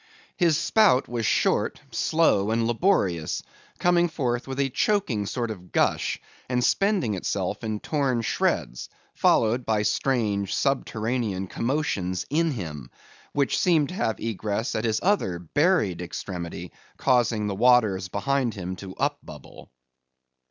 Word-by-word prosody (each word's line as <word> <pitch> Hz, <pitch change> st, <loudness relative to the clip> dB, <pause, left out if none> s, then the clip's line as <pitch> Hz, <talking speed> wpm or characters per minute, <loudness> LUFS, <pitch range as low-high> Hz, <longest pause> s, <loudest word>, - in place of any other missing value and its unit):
His 170 Hz, -5 st, +3 dB
spout 210 Hz, -, +3 dB
was 120 Hz, -2 st, -2 dB
short, -, -, +1 dB
slow, 155 Hz, -11 st, +2 dB
and 115 Hz, +1 st, +1 dB
laborious; 110 Hz, -, +1 dB, 0.3 s
coming 175 Hz, -1 st, +3 dB
forth 125 Hz, -6 st, -2 dB
with 135 Hz, 0 st, -5 dB
a 135 Hz, -2 st, +1 dB
choking 140 Hz, -, 0 dB
sort 120 Hz, -1 st, -2 dB
of 90 Hz, -4 st, -10 dB
gush, -, -, +1 dB, 0.3 s
and 125 Hz, -1 st, +1 dB
spending 195 Hz, -, +2 dB
itself 95 Hz, -, -3 dB
in 110 Hz, -1 st, -2 dB
torn 135 Hz, -5 st, 0 dB
shreds, -, -, -1 dB, 0.2 s
followed 115 Hz, +3 st, +2 dB
by 110 Hz, -2 st, 0 dB
strange 105 Hz, -6 st, 0 dB
subterranean 115 Hz, -6 st, -1 dB
commotions 100 Hz, -6 st, -2 dB
in 165 Hz, +2 st, +2 dB
him, 80 Hz, -, -6 dB, 0.4 s
which 140 Hz, -2 st, +1 dB
seemed 160 Hz, -6 st, +3 dB
to -, -, -6 dB
have 110 Hz, -, -1 dB
egress 110 Hz, +1 st, -2 dB
at 110 Hz, -, -1 dB
his 110 Hz, -1 st, +1 dB
other 180 Hz, -, +1 dB
buried 105 Hz, -, +1 dB
extremity, 90 Hz, 0 st, -6 dB, 0.3 s
causing 120 Hz, -5 st, +2 dB
the 105 Hz, -, -1 dB
waters 110 Hz, -4 st, +3 dB
behind 125 Hz, +5 st, -1 dB
him 95 Hz, -1 st, -5 dB
to 95 Hz, 0 st, -9 dB
upbubble. 140 Hz, -, -5 dB
115 Hz, 130 wpm, -25 LUFS, 100-140 Hz, 0.4 s, His